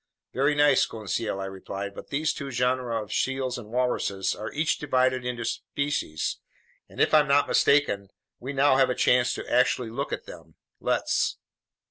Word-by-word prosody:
"Very 140 +3 +2
nice, 145 -2 +4
Conseil," 110 -1 -3
I 95 - -3
replied, 95 +1 -6
"but - - -10
these 150 +2 0
two 140 -1 -6
genera 125 -2 0
of 105 - -8
seals 130 -2 -1
and 105 -3 -11
walruses 120 -5 0
are 110 - -6
each 155 +2 0
divided 130 -3 +1
into 120 -1 -3
species, 130 - -2 0.5
and - - -13
if - - +3
I'm 150 -1 +6
not 140 +1 +4
mistaken, 140 -9 +3 0.3
we 130 +3 -5
now 135 -1 +3
have 135 -1 +4
a 125 - 0
chance 125 0 +3
to - - -7
actually 125 -1 +2
look - - -4
at - - -4
them. - - -12 0.2
Let's." - - 0
125 Hz, 170 wpm, -26 LUFS, 110-140 Hz, 0.5 s, I'm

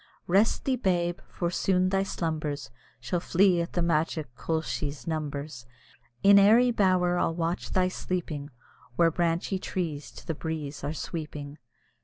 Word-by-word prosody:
Rest 200 +5 +2
thee, 265 -2 +1
babe! 175 -6 0
for 175 -1 -2
soon 185 0 +2
thy 195 0 +2
slumbers 155 -7 -3 0.3
Shall 130 +9 -2
flee 180 0 +3
at 170 - -5
the 175 - +1
magic 155 -4 0
koelshie's 150 -2 -3
numbers; 145 -5 -4 0.6
In 200 0 +8
airy 230 +5 +6
bower 185 -5 +2
I'll 165 - +1
watch 170 +1 -2
thy 185 -1 +2
sleeping, 165 -6 -4 0.5
Where 165 +3 +4
branchy 175 +3 0
trees 160 -7 -3
to - - -12
the 165 - -2
breeze 155 -2 -5
are 145 - -1
sweeping. 150 -2 -6
170 Hz, 145 wpm, -28 LUFS, 150-185 Hz, 0.6 s, In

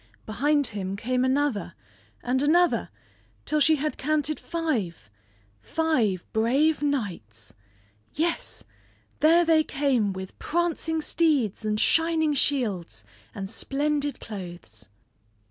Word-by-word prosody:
Behind 285 +6 +1
him 195 -4 -3
came 250 +5 -1
another, 260 -9 0 0.5
and 255 +2 0
another 345 +4 +3 0.6
till 305 - +1
she 310 +2 +5
had 300 +1 -3
counted 305 +1 0
five 220 - -3 0.5
five 230 - 0
brave 275 +9 +2
knights! 170 - -3 0.6
Yes, 335 +3 -2 0.6
there 335 +3 +5
they 320 -1 +4
came 265 -9 0
with 190 0 -8
prancing 325 -1 -1
steeds 285 - +1
and 215 0 -1
shining 325 0 +2
shields, 220 - 0 0.3
and 195 -1 -4
splendid 285 +5 -1
clothes! 175 - -9
275 Hz, 105 wpm, -26 LUFS, 205-310 Hz, 0.6 s, she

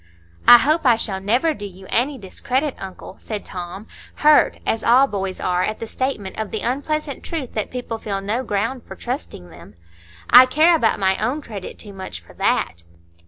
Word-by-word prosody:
"I 240 - +11
hope 310 +6 +1
I 245 -4 +5
shall 200 -4 -3
never 245 +11 +2
do 205 - -10
you 190 0 -13
any 265 +4 +1
discredit, 255 +7 -2
uncle," 190 0 -9
said 210 -2 -6
Tom, 180 +3 -7 0.4
hurt, 300 0 +5
as 225 - -1
all 250 +4 +6
boys 195 -6 -4
are 180 0 0
at 215 - -1
the - - -6
statement 220 -5 -4
of 215 -2 -3
the 220 - -4
unpleasant 285 +2 -2
truth 300 -7 -5
that 215 - -2
people 245 -3 -5
feel 200 -3 -3
no 210 +6 -2
ground 230 +4 -2
for - - -8
trusting 245 - -6
them. 100 - -14 0.5
"I 250 +2 +9
care 315 +6 +4
about 230 -9 +2
my 190 +1 +1
own 275 +7 -1
credit 205 -7 -8
too 205 -2 -8
much 190 -1 -7
for - - -18
that." 85 +1 0
225 Hz, 190 wpm, -21 LUFS, 195-265 Hz, 0.5 s, I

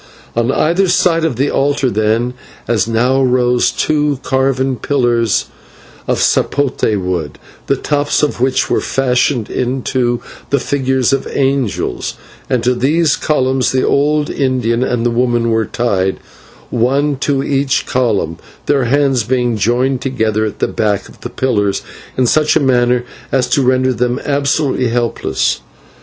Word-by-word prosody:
On 120 +2 +1
either 175 +7 +2
side 170 -2 +2
of 160 -6 0
the 135 +4 0
altar 140 -2 +1
then, 110 +4 0 0.3
as 110 -4 +1
now, 125 +4 +2
rose 125 -1 +2
two 150 -3 0
carven 130 0 0
pillars 120 -4 +1 0.6
of - - +1
/sapote/ 130 -7 +1
wood, 90 -5 -3 0.3
the - - +2
tops 145 0 0
of 145 -5 -1
which 130 0 +1
were - - 0
fashioned 125 -3 0
into 125 -1 -1 0.3
the 140 - +2
figures 130 -1 0
of 135 - -1
angels, 135 -5 -1 0.3
and 125 -3 0
to 125 +2 +2
these 150 +5 +2
columns 130 -3 0
the 130 0 +1
old 150 +1 +1
Indian 125 -3 0
and 120 -2 -1
the 120 - +2
woman 120 -1 +1
were 110 -2 +1
tied, 95 -6 0 0.5
one 140 +5 +1
to 135 0 0
each 140 -1 0
column, 105 -10 0 0.3
their 140 -3 +2
hands 135 -1 +2
being 120 0 0
joined 125 +5 +1
together 110 -5 0
at 105 - -5
the - - 0
back 105 -2 -1
of - - -18
the 120 - -5
pillars 110 -6 0 0.3
in 130 - +3
such 150 +5 +2
a - - +4
manner 125 -2 +2 0.3
as 130 -2 +1
to 140 - +2
render 130 0 +2
them 125 +2 -1
absolutely 140 -2 0
helpless. 120 0 -1
130 Hz, 150 wpm, -15 LUFS, 120-140 Hz, 0.6 s, a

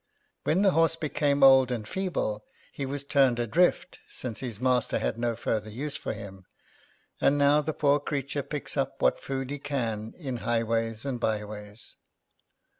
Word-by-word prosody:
When 185 +6 +2
the 195 - +5
horse 165 -1 +3
became 145 -3 0
old 135 -1 +7
and 115 -4 -3
feeble, 165 - -2 0.3
he 140 - -4
was 140 +1 -2
turned 135 -3 +3
adrift, 165 +10 +1
since 115 -5 -5
his 120 -5 -5
master 125 -1 +2
had 115 - -2
no 120 -1 0
further 110 -1 -2
use 140 +7 -5
for - - -3
him; 100 -3 -10 0.8
and 145 - +4
now 145 +1 +4
the 155 - -2
poor 145 -1 +2
creature 140 -1 -3
picks 150 +1 -4
up 135 -2 -2
what - - +2
food 135 0 -4
he 145 - -4
can 115 -7 -3
in 135 -7 -4
highways 115 0 -1
and 130 -3 -2
byways." 105 0 -4
130 Hz, 165 wpm, -28 LUFS, 115-145 Hz, 0.8 s, old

